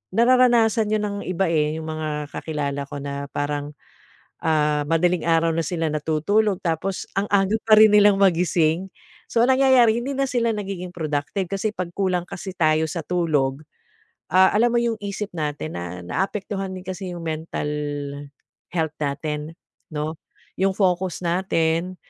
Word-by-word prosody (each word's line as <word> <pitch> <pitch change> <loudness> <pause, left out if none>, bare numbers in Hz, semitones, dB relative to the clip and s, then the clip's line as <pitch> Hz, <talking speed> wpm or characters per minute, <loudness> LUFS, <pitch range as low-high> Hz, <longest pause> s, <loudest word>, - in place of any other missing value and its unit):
nararanasan 235 -2 +4
yun 210 - -1
ng 205 -1 -2
iba, 185 +1 0
eh, 155 -1 +1
yung 160 - -7
mga 150 -2 -4
kakilala 140 -3 -3
ko 145 - -8
na 140 0 -4
parang, 145 0 -3 0.7
ah, 150 -2 +2
madaling 170 +2 +2
araw 165 0 +3
na 165 +1 0
sila 165 -3 -1
natutulog 160 +7 +1
tapos 175 +3 -2
ang 200 - 0
aga 200 +1 +3
pa 220 - +7
rin 215 0 +8
nilang 205 -1 +6
magising 175 -2 +2 0.4
so 230 - +1
ang 255 - +3
nangyayari 255 -4 +5
hindi 275 +3 -3
na 275 0 0
sila 235 -2 +1
nagiging 190 -3 -5
productive 155 +3 -2
kasi 200 +2 -1
pag 180 -3 -4
kulang 185 -3 0
kasi 190 +1 -7
tayo 155 -2 +2
sa 165 +1 -4
tulog, 150 -6 0 0.7
ah, 190 +1 +6
alam 235 +3 +3
mo - - +4
yung 230 -2 -1
isip 205 0 -5
natin 150 - -3
na 90 +1 -6
naapektuhan 195 - -3
din 185 - -8
kasi 185 -1 -5
yung 170 - -7
mental 160 -2 -3 1.0
health 160 -3 -1
natin 150 +2 -3 0.4
no, 155 +2 -3 0.4
yung 190 0 +2
focus 185 -2 0
natin. 170 0 0
175 Hz, 155 wpm, -23 LUFS, 155-200 Hz, 1.0 s, rin